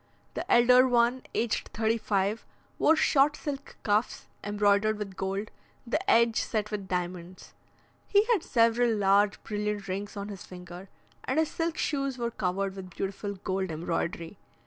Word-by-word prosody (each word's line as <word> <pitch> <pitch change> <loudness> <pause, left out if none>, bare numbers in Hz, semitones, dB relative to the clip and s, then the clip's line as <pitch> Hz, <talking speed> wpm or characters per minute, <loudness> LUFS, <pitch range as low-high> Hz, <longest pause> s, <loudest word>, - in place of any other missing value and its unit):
The - - -4
elder 250 +2 +6
one, 240 +1 +2
aged 230 -1 -1
thirty 225 +1 +1
five, 200 +1 0 0.4
wore 320 - +5
short 295 -1 +3
silk 280 -2 -6
cuffs, 210 +2 0 0.2
embroidered 205 +1 +2
with 200 -2 -6
gold, 195 +3 -3 0.3
the 275 +7 0
edge 230 - +4
set 215 -1 -2
with 200 -2 -4
diamonds; 180 0 -5 0.5
he 410 +1 +4
had 410 - +1
several 230 -3 +3
large 200 +1 +3
brilliant 210 -2 -3
rings 200 +2 -4
on 200 +1 -5
his 200 -3 -8
finger, 180 +1 -10 0.4
and - - -1
his 320 -1 +2
silk 330 -1 -2
shoes 275 -3 -1
were 235 -1 -2
covered 195 -1 -2
with 190 -1 -8
beautiful 200 +3 -4
gold 190 0 -3
embroidery. 165 +2 -3
210 Hz, 150 wpm, -28 LUFS, 195-240 Hz, 0.5 s, elder